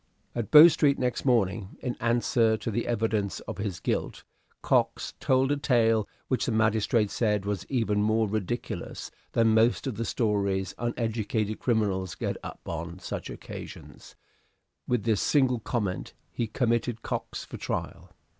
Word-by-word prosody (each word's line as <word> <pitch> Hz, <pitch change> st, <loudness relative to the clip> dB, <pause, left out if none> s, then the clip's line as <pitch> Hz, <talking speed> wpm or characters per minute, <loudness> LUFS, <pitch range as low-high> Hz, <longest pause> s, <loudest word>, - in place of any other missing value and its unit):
At 120 Hz, -3 st, -3 dB
Bow 155 Hz, +2 st, +11 dB
Street 145 Hz, -4 st, +3 dB
next 125 Hz, +1 st, -1 dB
morning, 105 Hz, -5 st, +1 dB
in 125 Hz, -2 st, -3 dB
answer 115 Hz, -1 st, +2 dB
to 110 Hz, +2 st, -4 dB
the 120 Hz, +3 st, -2 dB
evidence 110 Hz, -3 st, 0 dB
of 95 Hz, -, -7 dB
his 100 Hz, -4 st, -3 dB
guilt, -, -, -2 dB, 0.4 s
Cox -, -, +1 dB
told 130 Hz, +1 st, +2 dB
a 145 Hz, -, +2 dB
tale 115 Hz, -6 st, +2 dB, 0.2 s
which 130 Hz, -, 0 dB
the -, -, +1 dB
magistrate 110 Hz, -1 st, +2 dB
said 105 Hz, -4 st, 0 dB
was 100 Hz, -1 st, -3 dB
even 110 Hz, -6 st, +1 dB
more 110 Hz, +1 st, +2 dB
ridiculous 110 Hz, +3 st, -4 dB, 0.2 s
than 115 Hz, -1 st, +4 dB
most 115 Hz, +5 st, +3 dB
of 130 Hz, -7 st, -3 dB
the 115 Hz, -, -2 dB
stories 100 Hz, -5 st, 0 dB
uneducated 110 Hz, -2 st, -1 dB
criminals 100 Hz, -7 st, 0 dB
get -, -, -3 dB
up -, -, -8 dB
on 85 Hz, +1 st, -5 dB
such 95 Hz, -, -6 dB
occasions; -, -, -10 dB, 0.7 s
with 125 Hz, -4 st, 0 dB
this 110 Hz, -4 st, +1 dB
single 130 Hz, -4 st, +3 dB
comment 105 Hz, -5 st, -3 dB, 0.2 s
he 115 Hz, -, -2 dB
committed 115 Hz, 0 st, 0 dB
Cox -, -, -4 dB
for -, -, -8 dB
trial. -, -, -4 dB
110 Hz, 150 wpm, -27 LUFS, 105-120 Hz, 0.7 s, Bow